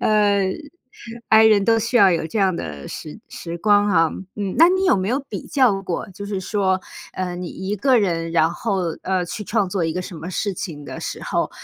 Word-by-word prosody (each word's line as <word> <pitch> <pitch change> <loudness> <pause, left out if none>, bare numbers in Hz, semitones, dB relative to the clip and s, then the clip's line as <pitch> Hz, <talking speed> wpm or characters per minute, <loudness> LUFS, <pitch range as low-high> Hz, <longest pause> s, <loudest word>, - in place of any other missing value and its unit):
呃 205 -3 +2 0.8
，I 220 0 +7
人 205 -2 +4
都 225 -1 +3
需 235 +3 0
要 195 -5 +6
有 165 -1 -1
这 215 - -3
样 190 -3 +2
的 75 - -6
时 155 +7 -8
时 170 0 -7
光 205 +1 +3
啊， 165 -4 +4 0.3
嗯。 200 -2 -3
那 335 +2 +7
你 375 +1 +1
有 365 - +4
没 190 +1 -1
有 260 +4 +1
比 - - -5
较 235 -9 +2
过， 180 +1 -4
就 200 +2 -8
是 200 -2 -3
说， 190 -1 0 0.3
呃， 180 -1 -3
你 175 -1 -5
一 190 +2 -4
个 255 +4 +3
人， 165 -5 -1
然 165 0 +2
后， 195 -1 -2 0.2
呃， 185 -1 0
去 210 +5 -6
创 210 -2 0
作 180 -3 -1
一 160 - -1
个 180 - -3
什 180 -1 -8
么 165 +4 -7
事 200 +1 -2
情 155 -6 -6
的 - - -7
时 - - -5
候， - - -1
195 Hz, 235 characters per minute, -21 LUFS, 175-210 Hz, 0.8 s, I